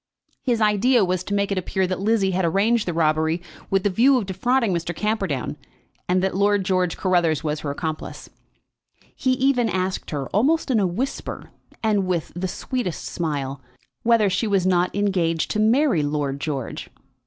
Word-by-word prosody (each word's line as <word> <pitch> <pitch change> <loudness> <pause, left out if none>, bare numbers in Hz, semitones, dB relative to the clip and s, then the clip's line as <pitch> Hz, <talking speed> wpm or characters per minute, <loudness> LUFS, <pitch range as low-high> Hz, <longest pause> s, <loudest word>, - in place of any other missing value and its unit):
His 240 -4 0
idea 215 +2 +4
was 185 0 -1
to 200 - -2
make 200 0 0
it 195 - +1
appear 190 +1 -1
that 185 0 -2
Lizzie 200 -1 +2
had 185 +1 0
arranged 205 +6 +2
the - - +1
robbery 160 +1 +1 0.3
with 195 -1 +1
the 205 - +2
view 255 +8 +4
of 230 - -1
defrauding 220 +3 +1
Mr. 170 0 -3
Camperdown, 195 - -2 0.5
and 185 +1 +2
that 190 - 0
Lord 200 0 +2
George 185 -2 0
Carruthers 175 -5 +1
was 150 -1 -1
her 150 - -4
accomplice. 155 +2 -5 0.9
He 260 - +1
even 255 -2 +2
asked 185 -1 -2
her, 140 -3 -3
almost 280 +8 +2
in 230 - +3
a 195 - +2
whisper, 230 +10 -4 0.3
and 205 -4 +1
with 175 -3 -1
the 185 +2 -2
sweetest 200 -1 -4
smile, 140 -5 -3 0.4
whether 230 -3 +4
she 195 +4 0
was 195 -3 +1
not 180 -1 +3
engaged 180 -5 0
to 215 - -1
marry 230 - +3
Lord 145 -1 -2
George. 140 -6 -4
190 Hz, 175 wpm, -23 LUFS, 170-215 Hz, 0.9 s, idea